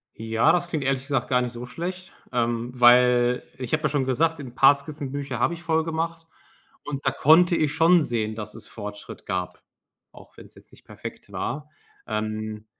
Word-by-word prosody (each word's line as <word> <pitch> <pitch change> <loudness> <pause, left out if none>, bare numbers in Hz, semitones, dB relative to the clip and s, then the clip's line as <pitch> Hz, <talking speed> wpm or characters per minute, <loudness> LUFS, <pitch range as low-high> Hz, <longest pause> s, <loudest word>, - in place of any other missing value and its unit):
Ja, 115 +7 +2
das 175 +1 +1
klingt 155 -5 -3
ehrlich 135 -1 0
gesagt 135 -3 -1
gar 125 -1 +3
nicht 125 -1 -3
so 120 +1 -7
schlecht, 180 +8 -6 0.2
ähm, 120 0 -1
weil 125 0 +5
ich 125 -2 -6
habe 155 0 +1
ja 155 - +2
schon 140 -2 0
gesagt: 160 +5 +1
„'N 125 -3 -9
paar 135 +2 +7
Skizzenbücher 140 -3 -6
habe 170 - +2
ich 170 0 -9
voll 160 -1 +1
gemacht”, 165 +1 -3 0.6
und 145 -1 -6
da 135 - +3
konnte 170 +6 +5
ich 155 -3 +1
schon 170 +1 +5
sehen, 110 -4 -2
dass 110 -1 -7
es 115 - -11
Fortschritt 105 -1 -9
gab, 90 -3 -4 0.5
auch - - -17
wenn’s - - -15
jetzt - - -19
nicht - - -18
perfekt - - -10
war. 150 +1 -4 0.4
Ähm, 110 0 -4
135 Hz, 190 wpm, -24 LUFS, 120-160 Hz, 0.6 s, paar